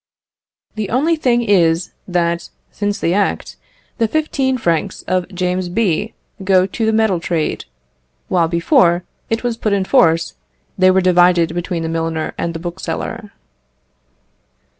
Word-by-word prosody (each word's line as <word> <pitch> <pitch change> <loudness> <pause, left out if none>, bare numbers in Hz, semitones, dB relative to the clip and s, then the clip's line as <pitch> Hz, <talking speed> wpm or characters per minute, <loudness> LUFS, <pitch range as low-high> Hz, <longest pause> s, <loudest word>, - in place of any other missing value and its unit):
The 215 -3 -4
only 300 +8 +2
thing 245 -6 +1
is 175 -5 +2 0.2
that, 170 -1 -1 0.2
since 205 0 -2
the 170 - 0
Act, 200 +1 -1 0.4
the 225 - +2
fifteen 270 -2 0
francs 175 -2 -1
of 185 -1 -1
James 180 -1 -2
B. 205 +1 -1 0.3
go 185 -1 +4
to 220 +4 -3
the - - +3
metal 220 -5 +2
trade, 165 -2 -2 0.6
while 170 -2 +2
before 175 - +3 0.3
it 225 +1 -1
was 240 -2 -1
put 215 -3 -1
in 195 -1 +1
force, 165 -10 +3 0.4
they 185 -1 +4
were 190 0 +4
divided 175 -2 +4
between 175 -1 -3
the - - -2
milliner 165 -1 -2
and 170 0 -3
the - - -4
bookseller. 180 +4 -5
185 Hz, 140 wpm, -18 LUFS, 170-220 Hz, 0.6 s, go